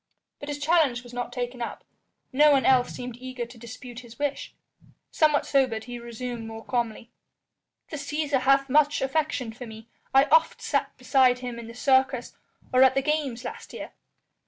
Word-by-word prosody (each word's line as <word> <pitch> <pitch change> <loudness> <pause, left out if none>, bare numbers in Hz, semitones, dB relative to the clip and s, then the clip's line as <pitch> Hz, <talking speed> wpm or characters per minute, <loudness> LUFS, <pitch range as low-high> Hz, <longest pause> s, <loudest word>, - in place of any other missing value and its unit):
But 285 - -7
his 290 - -3
challenge 290 -5 +2
was 245 0 -13
not 245 0 -4
taken 245 0 -4
up; 235 - -5 0.5
no 295 +3 +6
one 275 -2 +3
else 255 -2 +4
seemed 245 -1 -7
eager 255 -1 -5
to 235 +1 -14
dispute 240 +1 -9
his 235 -2 -13
wish. 285 -1 -3 0.6
Somewhat 305 -2 +3
sobered, 255 -6 +1
he 245 0 -7
resumed 235 0 -6
more 225 0 -9
calmly: 235 -1 -2 0.8
"The 305 - -4
Cæsar 290 -1 -1
hath 275 +1 +4
much 295 +1 +3
affection 270 -4 -1
for 245 +1 -9
me. 220 +1 -11 0.2
I 270 0 +6
oft 320 +1 +4
sat - - -1
beside 255 -3 +3
him 240 -1 -5
in 230 - -8
the 230 - -10
Circus 260 -1 +2 0.4
or 255 - +5
at 260 0 +6
the 270 - +1
games 285 -5 -1
last 245 - -8
year. - - -7
255 Hz, 180 wpm, -26 LUFS, 240-280 Hz, 0.8 s, no